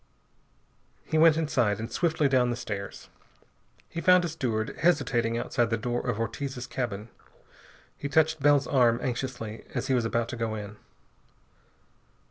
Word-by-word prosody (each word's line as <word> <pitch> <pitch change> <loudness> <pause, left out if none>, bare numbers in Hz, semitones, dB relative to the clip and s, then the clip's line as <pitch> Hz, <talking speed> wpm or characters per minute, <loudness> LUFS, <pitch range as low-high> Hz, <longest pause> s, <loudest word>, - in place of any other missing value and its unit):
He 155 - 0
went 160 -1 +6
inside 125 -10 +1
and 115 +1 -5
swiftly 160 +2 +1
down 130 -2 +3
the 120 - -1
stairs. 105 -5 -6 0.8
He 170 - -5
found 180 -1 +5
a - - -2
steward 120 -8 -2
hesitating 125 -9 +2
outside 120 0 0
the 115 - 0
door 120 +2 -2
of 105 - -1
Ortiz's 125 +3 -4
cabin. 115 -5 -4 0.9
He 145 - -5
touched 160 +2 +3
Bell's 145 0 +4
arm 120 -3 +3
anxiously 120 -3 -4
as - - -2
he - - +3
was 125 -2 +2
about 115 0 0
to - - -4
go 115 -2 -2
in. 105 0 -7
125 Hz, 150 wpm, -27 LUFS, 115-145 Hz, 0.9 s, went